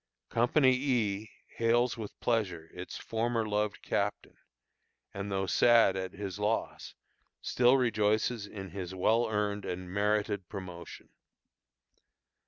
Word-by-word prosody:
Company 130 Hz, +3 st, +4 dB
E 115 Hz, -6 st, 0 dB, 0.3 s
hails 120 Hz, +2 st, +2 dB
with 110 Hz, -3 st, -8 dB
pleasure 95 Hz, -9 st, -1 dB
its 90 Hz, +1 st, -7 dB
former 115 Hz, 0 st, -1 dB
loved 105 Hz, 0 st, -1 dB
captain, -, -, -2 dB, 0.8 s
and 100 Hz, +1 st, -5 dB
though 95 Hz, 0 st, 0 dB
sad 115 Hz, -1 st, +5 dB
at 95 Hz, -1 st, -4 dB
his 100 Hz, 0 st, -6 dB
loss, 105 Hz, +2 st, -2 dB, 0.4 s
still 125 Hz, +2 st, +3 dB
rejoices 110 Hz, -2 st, +1 dB
in 95 Hz, -3 st, -8 dB
his 95 Hz, 0 st, -6 dB
well 110 Hz, +5 st, +2 dB
earned 105 Hz, -1 st, -1 dB
and 90 Hz, 0 st, -5 dB
merited 105 Hz, -1 st, 0 dB
promotion. 90 Hz, -4 st, -8 dB
105 Hz, 115 wpm, -31 LUFS, 95-115 Hz, 0.8 s, sad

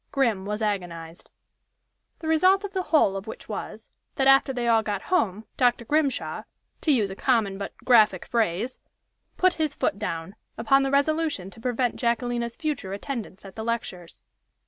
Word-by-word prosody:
Grim 230 Hz, -9 st, +1 dB
was 210 Hz, +1 st, -2 dB
agonized. 175 Hz, -5 st, -4 dB, 0.9 s
The 320 Hz, -, -5 dB
result 370 Hz, +5 st, +4 dB
of 405 Hz, -1 st, -6 dB
the 380 Hz, -, 0 dB
whole 290 Hz, -11 st, +4 dB
of 195 Hz, +2 st, -6 dB
which 220 Hz, -, -8 dB
was -, -, -6 dB, 0.3 s
that 270 Hz, -, +1 dB
after 270 Hz, 0 st, +6 dB
they 245 Hz, -2 st, -2 dB
all 225 Hz, -1 st, +4 dB
got 205 Hz, -3 st, -3 dB
home, 215 Hz, -, +1 dB
Dr. 245 Hz, -2 st, +2 dB
Grimshaw 295 Hz, 0 st, 0 dB, 0.4 s
to 310 Hz, -, +2 dB
use 215 Hz, -8 st, +2 dB
a -, -, -6 dB
common 210 Hz, -5 st, +1 dB
but 200 Hz, -, -6 dB
graphic 215 Hz, -7 st, +5 dB
phrase 225 Hz, +1 st, -1 dB, 0.6 s
"put 370 Hz, 0 st, +4 dB
his 310 Hz, -2 st, -2 dB
foot 200 Hz, -, -1 dB
down" 165 Hz, +4 st, -4 dB, 0.2 s
upon 255 Hz, +5 st, +4 dB
the 270 Hz, -, 0 dB
resolution 285 Hz, -, 0 dB
to 225 Hz, -, -14 dB
prevent 245 Hz, 0 st, 0 dB
Jacquelina's 235 Hz, 0 st, -1 dB
future 295 Hz, -12 st, -3 dB
attendance 215 Hz, -3 st, -6 dB
at 195 Hz, -, -11 dB
the 220 Hz, -, -5 dB
lectures. 220 Hz, -7 st, -5 dB
235 Hz, 170 wpm, -25 LUFS, 200-275 Hz, 0.9 s, after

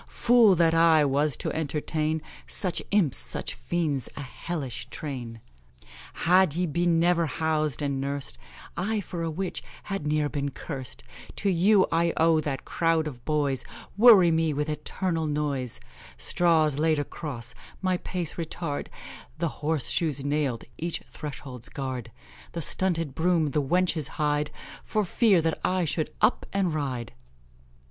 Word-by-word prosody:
Fool 230 Hz, -5 st, +5 dB
that 165 Hz, -1 st, +3 dB
I 165 Hz, -2 st, +5 dB
was 140 Hz, +1 st, +1 dB
to -, -, -2 dB
entertain 155 Hz, 0 st, -1 dB, 0.2 s
Such 180 Hz, -4 st, 0 dB
imps, 195 Hz, -10 st, +3 dB
such -, -, -3 dB
fiends 155 Hz, -6 st, -2 dB
a -, -, -4 dB
hellish 135 Hz, -2 st, -5 dB
train; 120 Hz, -6 st, -6 dB, 0.8 s
Had 180 Hz, -2 st, +5 dB
ye 180 Hz, +1 st, +1 dB
been 170 Hz, +1 st, +2 dB
never 170 Hz, -1 st, +3 dB
housed 155 Hz, -2 st, -1 dB
and 140 Hz, -1 st, -1 dB
nursed, 140 Hz, -, -2 dB, 0.4 s
I 210 Hz, +5 st, -1 dB
for 180 Hz, -3 st, -5 dB
a 165 Hz, -, -1 dB
witch 180 Hz, +4 st, -3 dB, 0.2 s
had 195 Hz, -7 st, -4 dB
n'er 150 Hz, 0 st, +1 dB
been 145 Hz, -1 st, -2 dB
cursed; 135 Hz, -1 st, -7 dB, 0.3 s
To 200 Hz, -, +1 dB
you 190 Hz, +3 st, +5 dB
I 165 Hz, 0 st, +2 dB
owe 165 Hz, 0 st, +4 dB
that 145 Hz, -3 st, -3 dB
crowd 165 Hz, -1 st, +1 dB
of 125 Hz, -6 st, -7 dB
boys 145 Hz, -4 st, +1 dB, 0.3 s
Worry 205 Hz, -6 st, +8 dB
me 160 Hz, -1 st, +2 dB
with 150 Hz, +2 st, -1 dB
eternal 160 Hz, +2 st, -2 dB
noise; 145 Hz, -5 st, -2 dB, 0.4 s
Straws 160 Hz, -4 st, +2 dB
laid 160 Hz, 0 st, +3 dB
across, 140 Hz, -4 st, -4 dB, 0.3 s
my 185 Hz, -1 st, +1 dB
pace 175 Hz, -3 st, -3 dB
retard; 160 Hz, -2 st, -3 dB, 0.5 s
The 170 Hz, 0 st, 0 dB
horse 150 Hz, -2 st, 0 dB
shoes 145 Hz, -5 st, 0 dB
nailed 145 Hz, -5 st, 0 dB, 0.2 s
(each 170 Hz, +1 st, -3 dB
threshold's 135 Hz, -5 st, -7 dB
guard); 130 Hz, -5 st, -5 dB, 0.4 s
The 170 Hz, -, -3 dB
stunted 165 Hz, -6 st, +1 dB
broom 165 Hz, -1 st, +2 dB
the 150 Hz, -, +1 dB
wenches 170 Hz, 0 st, +1 dB
hide, 150 Hz, -1 st, +1 dB, 0.3 s
For 215 Hz, -2 st, 0 dB
fear 195 Hz, -3 st, +3 dB
that 160 Hz, 0 st, 0 dB
I 185 Hz, -1 st, +1 dB
should 155 Hz, 0 st, -2 dB
up 215 Hz, +3 st, +3 dB
and 190 Hz, -4 st, 0 dB
ride. 130 Hz, -, -3 dB
155 Hz, 145 wpm, -27 LUFS, 145-175 Hz, 0.8 s, Worry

